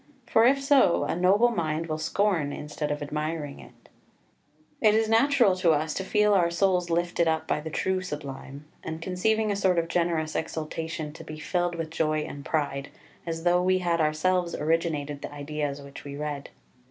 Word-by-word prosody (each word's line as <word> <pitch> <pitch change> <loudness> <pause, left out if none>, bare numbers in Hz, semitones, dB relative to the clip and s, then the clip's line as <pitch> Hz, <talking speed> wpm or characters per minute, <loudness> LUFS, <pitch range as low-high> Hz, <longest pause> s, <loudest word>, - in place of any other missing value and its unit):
for 225 0 +4
if 275 +2 +4
so, 275 - +4
a - - -1
noble 200 +7 +4
mind 160 -5 -1
will 155 -1 -3
scorn 165 -2 +1
instead 150 +1 -4
of 150 0 -2
admiring 150 0 -4
it. - - -16 0.9
2 - - +5
It 210 - +3
is 220 0 +2
natural 230 -3 +4
to 175 -3 +4
us 155 +1 0
to 190 - -3
feel 210 +1 +3
our 175 -3 +4
souls 180 0 +1
lifted 170 0 +1
up 160 0 0
by - - 0
the 155 +1 -6
true 185 +4 -1
Sublime, 140 -4 -7 0.2
and 160 0 -5
conceiving 210 +5 0
a - - 0
sort 190 -3 +2
of 165 0 +1
generous 165 -2 0
exultation 160 -1 -4
to - - -10
be 155 - -8
filled 175 +2 -1
with 165 -1 -4
joy 155 -1 0
and 145 -1 -7
pride, 140 -1 -2 0.4
as 165 0 -3
though 175 0 +4
we 185 +1 +3
had 170 -2 0
ourselves 170 +3 +1
originated 150 -3 -1
the - - -6
ideas 145 0 -4
which 140 0 -11
we 140 0 -7
read. 145 -1 -4
165 Hz, 190 wpm, -27 LUFS, 150-185 Hz, 0.9 s, 2